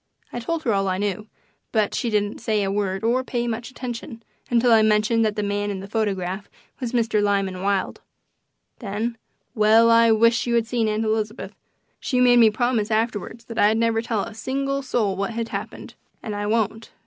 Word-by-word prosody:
I 240 - -3
told 320 +7 -3
her 230 - +1
all 195 -1 +1
I 185 0 0
knew, 205 +1 -3 0.4
but 215 -2 +1
she 240 - -1
didn't 205 -1 -1
say 215 -2 0
a 195 - -1
word 195 -1 -2
or 245 +3 +1
pay 240 -2 -2
much 235 +2 -4
attention 240 -2 -7 0.3
until 240 0 +3
I 225 -1 +6
mentioned 215 +1 +3
that 215 -1 0
the 210 - -2
man 205 0 -1
in 200 -2 -4
the 195 - -8
photograph 195 -3 -2 0.3
was 245 -3 -3
Mr. 230 -3 +1
Lyman 195 -2 0
Wilde. 195 0 -1 0.8
Then 220 +2 -3 0.4
well, 225 0 +5
I 230 0 +6
wish 230 +2 +3
you 235 - +1
had 230 -1 +2
seen 235 -1 0
Aunt 215 +1 -1
Elizabeth! 215 0 -2 0.5
She 255 - -1
made 245 -1 +6
me 225 -2 +7
promise 225 -1 0
afterwards 225 0 -2
that 230 -1 -6
I'd 215 +2 +4
never 230 -1 +1
tell 225 -3 -1
a - - -8
single 275 +4 -2
soul 225 -7 0
what 200 +1 -2 0.2
happened, - - -6 0.3
and 215 -3 -4
I 205 0 -3
won't. 220 0 -1
220 Hz, 195 wpm, -23 LUFS, 205-235 Hz, 0.8 s, me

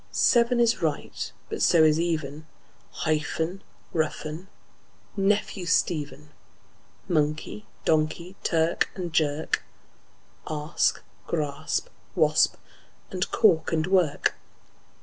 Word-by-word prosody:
Seven 240 0 +3
is 235 -1 +3
right, 155 -3 -2 0.2
but - - -5
so 165 - +5
is 155 0 +4
even; 155 -3 -2 0.4
Hyphen, 160 +3 -2 0.3
roughen, 155 +2 -2 0.7
nephew, 195 -2 0
Stephen; 150 -3 0 0.8
Monkey, 155 +5 -1 0.2
donkey; 160 +4 0
clerk 165 0 +1
and 175 -3 -5
jerk; 155 -1 +1 0.9
Asp, 155 +1 +1 0.3
grasp, 155 - -2 0.3
wasp; - - +4 0.6
and 185 -1 -1
cork 190 -8 +3
and 160 -1 +1
work. 180 -6 +2
160 Hz, 90 wpm, -26 LUFS, 155-185 Hz, 0.9 s, so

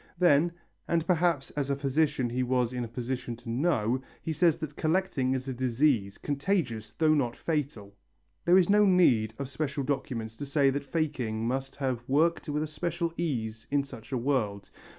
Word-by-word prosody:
Then, 170 -1 +4 0.3
and 165 -1 +1
perhaps 170 -5 +1
as 140 -2 -2
a 140 - +2
physician 140 -2 0
he 125 +1 -1
was 125 -1 +1
in 125 -1 -2
a - - -4
position 120 +1 -4
to 120 +1 -11
know, 130 -3 +1 0.2
he 160 - -2
says 160 +1 +3
that 150 -2 -6
collecting 155 -6 +1
is 130 +1 -4
a 130 - -2
disease, 125 -4 +1
contagious 135 - -2
though 155 -1 +4
not 125 -6 +1
fatal. 140 -11 -3 0.5
There 175 +2 +5
is 180 -2 +5
no 210 +1 +5
need 125 - +4
of 140 - -4
special 140 +1 -3
documents 115 -5 -3
to 145 - -5
say 140 -1 +3
that 140 +1 -3
faking 130 -9 -1
must 135 +2 -2
have 130 -4 -2
worked 160 +4 +2
with 150 +1 0
a - - -1
certain 170 +2 -2
ease 115 -10 -3
in 140 0 +2
such 135 -3 -11
a 130 - 0
world. 115 -6 -1
140 Hz, 185 wpm, -29 LUFS, 120-155 Hz, 0.5 s, There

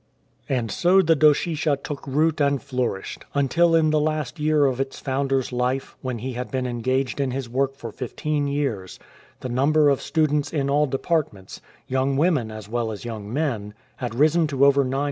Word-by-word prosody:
And 120 -5 -1
so 185 +2 +4
the 165 -1 +4
Doshisha 150 -1 +2
took 145 -2 -6
root 155 +3 +1
and 140 -1 +2
flourished, 125 -8 -3
until 165 +5 +3
in 155 -1 +3
the 155 - +3
last 155 -3 -2
year 150 -1 +3
of 130 -2 0
its 135 0 -4
founder's 135 -1 -1
life, 125 +2 -1
when 130 -2 -3
he 130 +3 -5
had 125 +1 -5
been 130 -1 -2
en 120 -1 -3
gaged 130 0 0
in 135 -2 +1
his 130 0 -4
work 135 +3 -1
for 115 -4 -8
fifteen 145 +4 -2
years, 135 -10 -2 0.4
the 130 - -4
number 145 +4 +3
of 140 - 0
students 150 -2 0
in 140 -3 -1
all 150 +1 +3
departments, 135 - -2 0.2
young 130 +1 0
women 150 -7 +2
as 110 -1 -8
well 115 0 -2
as 105 +2 -8
young 110 -3 -6
men, 115 -8 -2 0.2
had 120 -2 -4
risen 155 +4 +3
to 140 -2 +2
over 140 0 +5
900. 130 +1 -2
135 Hz, 190 wpm, -23 LUFS, 125-150 Hz, 0.4 s, over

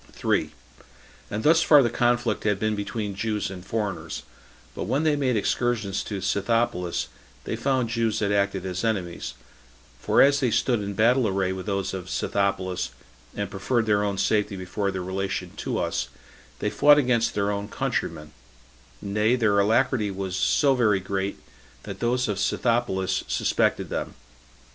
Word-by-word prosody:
3. - - 0 0.8
And 105 +1 -3
thus 160 +2 +5
far 150 -3 +6
the 120 - 0
conflict 120 -2 +1
had 105 -2 +1
been 110 +1 0
between 105 0 -3
Jews 105 0 -2
and 90 -2 -8
foreigners; 95 -7 -3 0.5
but - - -4
when 140 +4 0
they 155 -2 +3
made 130 -5 +1
excursions 110 -2 0
to 100 -3 -4
Scythopolis, 100 -2 0 0.4
they - - -3
found 130 -4 0
Jew 115 -1 +1
that 100 -1 0
acted 100 -2 0
as 95 -1 -3
enemies; 95 -6 -2 0.6
for - - +1
as 140 +1 +4
they 130 -3 +2
stood 120 0 +1
in 100 0 -4
battle 120 +3 +3
array 95 -1 0
with 95 +2 -7
those 100 -2 -1
of 90 -1 -6
Scythopolis, 95 -6 -1 0.5
and 100 -1 -3
preferred 115 +4 0
their 105 -1 +2
own 100 -1 -1
safety 105 0 +1
before 95 +2 -2
their 95 -1 -3
relation 95 +1 -3
to - - -2
us, - - -1 0.5
they 105 - -2
fought 145 0 +6
against 120 -5 +2
their 100 0 +1
own 100 0 -3
countrymen; 75 -5 -3 0.7
nay, 105 +4 +2
their 110 -5 +2
alacrity 110 +1 +2
was 95 -1 -4
so 140 +7 +3
very 110 -6 +3
great, 95 +1 -3 0.5
that - - -7
those 125 +2 +1
of 105 -2 -2
Scythopolis 115 -3 0
suspected - - +1
them. - - -4
105 Hz, 160 wpm, -25 LUFS, 95-120 Hz, 0.8 s, far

